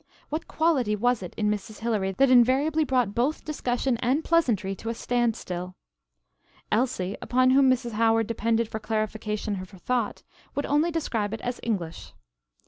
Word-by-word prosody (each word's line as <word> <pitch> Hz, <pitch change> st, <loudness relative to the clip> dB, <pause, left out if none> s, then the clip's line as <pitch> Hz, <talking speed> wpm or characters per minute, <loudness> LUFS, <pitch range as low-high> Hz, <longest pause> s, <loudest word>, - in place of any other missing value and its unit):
What 310 Hz, +3 st, -3 dB
quality 285 Hz, -10 st, +1 dB
was 245 Hz, +2 st, +1 dB
it 180 Hz, -, -8 dB
in 210 Hz, -1 st, +1 dB
Mrs. 210 Hz, +1 st, -5 dB
Hilary 210 Hz, -4 st, 0 dB
that 270 Hz, +6 st, +3 dB
invariably 270 Hz, +6 st, +4 dB
brought 250 Hz, -7 st, +1 dB
both 255 Hz, +7 st, 0 dB
discussion 255 Hz, -4 st, -1 dB
and 265 Hz, +6 st, +1 dB
pleasantry 230 Hz, -, +2 dB
to 225 Hz, -, -5 dB
a 230 Hz, -, -2 dB
standstill? 215 Hz, -8 st, -2 dB, 1.0 s
Elsie, 215 Hz, -5 st, 0 dB
upon 255 Hz, +1 st, +3 dB
whom 265 Hz, 0 st, +5 dB
Mrs. 245 Hz, -2 st, +1 dB
Howard 225 Hz, +1 st, +2 dB
depended 230 Hz, +1 st, 0 dB
for 220 Hz, -, -5 dB
clarification 215 Hz, -2 st, -2 dB
of 185 Hz, -, -9 dB
her 195 Hz, -, -14 dB
thought, 240 Hz, +3 st, -2 dB, 0.3 s
would 285 Hz, -, -1 dB
only 300 Hz, +4 st, +2 dB
describe 225 Hz, -10 st, -2 dB
it 225 Hz, -, -10 dB
as 245 Hz, 0 st, -3 dB
"English." 180 Hz, -8 st, -4 dB
230 Hz, 160 wpm, -26 LUFS, 210-260 Hz, 1.0 s, whom